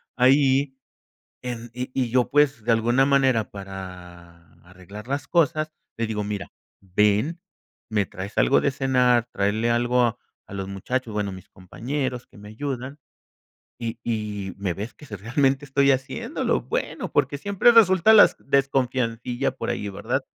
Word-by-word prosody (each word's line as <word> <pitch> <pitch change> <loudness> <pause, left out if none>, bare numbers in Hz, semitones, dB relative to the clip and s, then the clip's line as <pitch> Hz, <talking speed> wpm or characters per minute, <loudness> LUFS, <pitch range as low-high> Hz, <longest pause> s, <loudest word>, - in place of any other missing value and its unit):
ahí 135 +1 +3 0.7
en? 120 -2 -6
Y 125 +1 -6
y 125 -3 0
yo, 125 0 +2
pues, 145 -5 +2
de 115 - +2
alguna 120 +4 +3
manera 130 -6 +2
para 90 -3 -10 0.2
arreglar 100 +5 -12
las 140 +1 -2
cosas, 155 -2 +1 0.2
le 115 0 -1
digo: 105 -2 -3
"Mira, 100 -1 -5 0.3
ven, 105 - +1 0.5
me 105 -2 +1
traes 95 +3 -7
algo 140 - +4
de 140 - +1
cenar, 125 -3 +2
tráele 105 +4 0
algo 120 +1 +2
a 120 0 +1 0.3
a 100 - -10
los 95 -1 -4
muchachos, 115 +4 -3
bueno, 105 -2 -1
a - - -8
mis 95 -1 -11
compañeros 125 +7 -5
que - - -21
me 105 +1 -11
ayudan, 135 +4 -5 0.8
y 115 0 -4
y 105 -4 -3
me 95 -3 -2
ves 105 +6 -6
que 150 - -15
sí 105 - -7
realmente 135 - 0
estoy 140 0 +3
haciéndolo", 130 0 -1
bueno, - - -4
porque 145 - +1
siempre 200 +6 +4
resulta 215 -2 +6
las 215 - +7
desconfiancilla 130 -3 0
por - - -4
ahí, 105 - -4
¿verdad? 100 +1 -2
120 Hz, 155 wpm, -24 LUFS, 105-135 Hz, 0.8 s, las